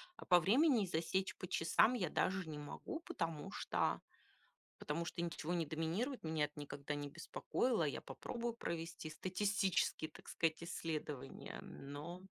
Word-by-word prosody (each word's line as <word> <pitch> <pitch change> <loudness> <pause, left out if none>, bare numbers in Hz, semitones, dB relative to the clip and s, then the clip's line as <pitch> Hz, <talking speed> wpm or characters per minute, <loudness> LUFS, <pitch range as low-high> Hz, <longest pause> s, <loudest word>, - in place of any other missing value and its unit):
а - - -10
по 180 -1 +8
времени 235 - +5
засечь, 180 +3 0
по 185 - -5
часам 170 +9 +5
я 180 -10 +1
даже 185 -1 +1
не 150 - -4
могу, 310 - -5
потому 165 - -3
что, - - +1 0.8
потому 165 +3 -1
что 170 - -2
ничего 170 0 -1
не 170 -2 +2
доминирует. 165 - -1
Меня 160 -2 +2
это 150 0 -11
никогда 145 0 -4
не 145 0 -3
беспокоило. 170 - 0
Я 145 - -1
попробую 235 -1 -3
провести 165 -6 -3
статистические, 185 -2 +1
так - - -13
сказать, 165 0 +1
исследования, 155 -5 -4
но 150 +6 -7
170 Hz, 145 wpm, -39 LUFS, 155-190 Hz, 0.8 s, по